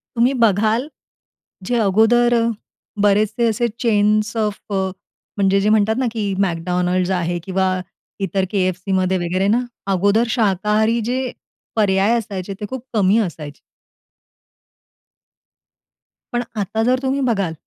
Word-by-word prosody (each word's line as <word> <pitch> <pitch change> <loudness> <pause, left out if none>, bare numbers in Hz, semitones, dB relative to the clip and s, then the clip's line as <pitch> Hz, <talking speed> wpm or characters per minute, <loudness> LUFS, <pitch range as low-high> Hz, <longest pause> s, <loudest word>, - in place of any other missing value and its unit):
तुम्ही 240 +3 +3
बघाल, 220 +4 +2 0.8
जे 245 - 0
अगोदर 225 +4 +3 0.7
बरेचसे 210 +3 +2
असे 225 +2 0
चेन्स 210 -1 +2
ऑफ 210 -2 -1
अ, 195 - +1 0.6
म्हणजे 195 -1 +2
जे 205 - +1
म्हणतात 215 0 +3
ना, 260 - +1
की 210 -3 -2
McDonald's 180 +1 -1
आहे 175 0 -2
किंवा 190 0 0 0.5
इतर 195 0 0
KFCमध्ये 185 -1 0
वगैरे 180 +2 -1
ना, 230 +4 +3 0.3
अगोदर 200 +5 +3
शाकाहारी 215 +1 +1
जे 255 +1 0 0.6
पर्याय 205 +1 +3
असायचे, 200 -4 -5
ते 210 - -3
खूप 260 -2 -6
कमी 205 0 +3
असायचे. 155 -8 -4 2.7
पण 240 0 0 0.2
आता 210 +3 -1
जर 255 +2 +2
तुम्ही 265 +1 0
बघाल, 195 -7 0
205 Hz, 120 wpm, -19 LUFS, 190-225 Hz, 2.7 s, तुम्ही